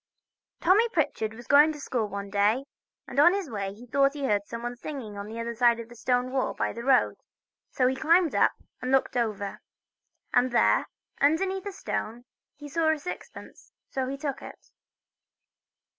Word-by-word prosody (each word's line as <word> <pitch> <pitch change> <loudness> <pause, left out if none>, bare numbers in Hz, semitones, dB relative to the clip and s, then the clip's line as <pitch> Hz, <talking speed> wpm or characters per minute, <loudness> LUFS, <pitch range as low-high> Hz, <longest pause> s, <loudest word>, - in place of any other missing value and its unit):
TOMMY 420 +7 +4
PRITCHARD 270 - -1
was 240 +1 -11
going 295 +4 +6
to 295 - -10
school 245 -5 -2
one 200 0 -6
day, 210 +6 +2 0.4
and 265 - -2
on 345 +6 +7
his 380 -9 -4
way 200 -3 -3
he 220 +5 -12
thought 275 +3 +2
he 285 -2 -3
heard 205 -4 0
somebody 235 +1 -5
singing 245 -4 -7
on 200 0 -6
the 225 +2 -7
other 235 0 -3
side 235 0 +3
of 230 0 -9
a - - -11
stone 250 +1 0
wall 265 -1 -1
by - - -1
the 235 - -7
road, 265 -1 +3 0.5
so 255 - +1
he 260 +1 +2
climbed 330 +3 +3
up - - +3 0.3
and 255 - -2
looked 270 -1 +2
over, 210 -4 -2 0.7
and 250 +1 +4
there 240 - +3 0.3
underneath 375 +7 +1
a - - -3
stone 245 - -4 0.3
he 295 +1 -10
saw 320 +2 +1
a 315 - 0
sixpence, 330 +5 -9 0.2
so 260 -1 -2
he 275 - -4
took 275 -1 -4
it. - - -12
255 Hz, 185 wpm, -27 LUFS, 230-295 Hz, 0.7 s, on